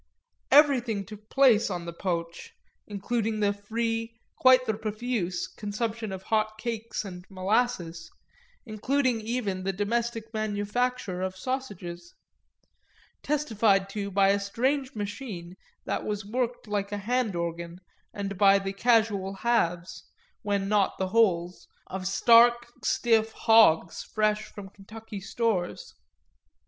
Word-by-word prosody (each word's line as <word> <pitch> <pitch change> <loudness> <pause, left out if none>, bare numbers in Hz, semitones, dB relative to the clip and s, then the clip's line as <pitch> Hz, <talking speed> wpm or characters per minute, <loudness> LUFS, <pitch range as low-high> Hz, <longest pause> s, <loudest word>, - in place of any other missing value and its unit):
Everything 250 -8 +4
took 210 0 -12
place 245 -6 +4
on 175 -3 -4
the 170 - -6
poo'ch, 170 -1 -4 0.3
including 215 +2 -2
the 205 -1 +2
free, 225 +2 -3 0.2
quite 255 -1 +5
the 220 - 0
profuse, 215 -4 -3
consumption 215 +1 -4
of 190 0 -6
hot 215 0 0
cakes 230 -1 -4
and 180 -2 -8
molasses, 190 -3 -1 0.6
including 250 +2 0
even 215 -4 -2
the 195 +1 -1
domestic 225 +3 -2
manufacture 215 -1 -2
of 190 0 -3
sausages, 185 -8 -5 1.1
testified 220 -9 +1
to 200 0 -4
by 195 0 +3
a 200 +1 +3
strange 260 +7 -1
machine 205 -4 -6 0.3
that - - -2
was 210 -1 -3
worked 240 +2 -3
like 205 -1 -2
a 205 - -2
handorgan 175 -7 -2 0.3
and 200 -2 -5
by 200 -1 +6
the 195 0 -3
casual 210 -3 +2
halves, 185 -6 -1 0.3
when 200 -1 -1
not 205 -1 +1
the 190 -1 -2
wholes, 180 -5 +1 0.2
of 185 0 -5
stark 235 +4 +5 0.2
stiff 225 -2 +2
hogs 215 -8 +4
fresh 215 0 0
from 205 -2 -10
Kentucky 205 +2 -10
stores. 195 -3 -2
210 Hz, 120 wpm, -27 LUFS, 195-230 Hz, 1.1 s, by